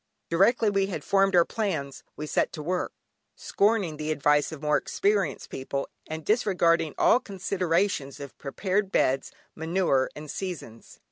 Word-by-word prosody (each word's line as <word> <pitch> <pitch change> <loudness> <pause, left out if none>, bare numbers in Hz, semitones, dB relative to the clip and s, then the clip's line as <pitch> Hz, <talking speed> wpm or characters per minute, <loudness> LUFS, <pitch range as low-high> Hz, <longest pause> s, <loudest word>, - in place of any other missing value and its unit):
Directly 210 +5 +4
we 195 -1 +1
had 195 - -5
formed 195 -1 +3
our 170 -1 +6
plans 160 - -3
we 150 - -5
set - - 0
to 150 - -6
work, 180 +3 -1 0.4
scorning 200 -7 +1
the 155 0 -4
advice 150 0 +2
of 160 - -7
more 150 0 +2
experienced 200 +3 0
people, 140 +1 -3 0.2
and 160 0 -6
disregarding 170 - +2
all 245 - +5
considerations 185 - -1
of 140 -3 -9
prepared 190 +7 -1
beds, 135 -6 +1 0.2
manure, 160 -5 +1
and 150 0 -7
seasons. 170 - -7
170 Hz, 145 wpm, -27 LUFS, 150-195 Hz, 0.4 s, our